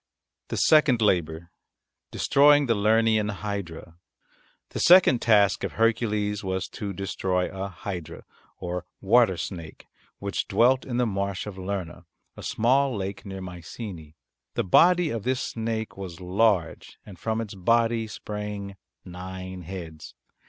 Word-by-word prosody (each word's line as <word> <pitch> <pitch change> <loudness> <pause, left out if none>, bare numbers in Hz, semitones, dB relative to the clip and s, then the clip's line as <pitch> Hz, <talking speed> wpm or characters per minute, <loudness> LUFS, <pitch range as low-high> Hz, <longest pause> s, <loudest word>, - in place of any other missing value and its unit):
THE - - -4
SECOND 150 -6 +4
LABOUR 85 -5 0 0.6
DESTROYING 145 +1 +4
THE 120 - +2
LERNEAN 110 0 +2
HYDRA 95 -5 -6 0.7
The - - -5
second 175 -9 +6
task 105 -4 +3
of - - -3
Hercules 105 -2 0
was 95 0 -2
to 100 -1 -5
destroy 95 -1 -2
a 95 +1 -3
hydra 90 -2 -7 0.3
or 90 0 -4 0.2
water 105 -2 +4
snake 85 -2 -7 0.3
which 100 0 -3
dwelt 125 +6 +3
in 120 -2 -3
the 125 - +2
marsh 100 -3 -2
of 100 -2 -8
Lerna, 95 -3 -5 0.3
a - - -10
small 130 +2 +1
lake 100 +1 -5
near 95 -1 -6
Mycenae. 90 -2 -8 0.4
The - - +1
body 175 - +4
of 115 - -3
this 130 +4 -1
snake 110 -2 -3
was 95 -3 -7
large 95 -1 0
and 95 -5 -12
from 110 0 -2
its 110 -3 -5
body 115 +3 +1
sprang 105 -2 -6 0.3
nine 95 0 -7
heads. 85 -3 -9
100 Hz, 135 wpm, -26 LUFS, 90-115 Hz, 0.7 s, second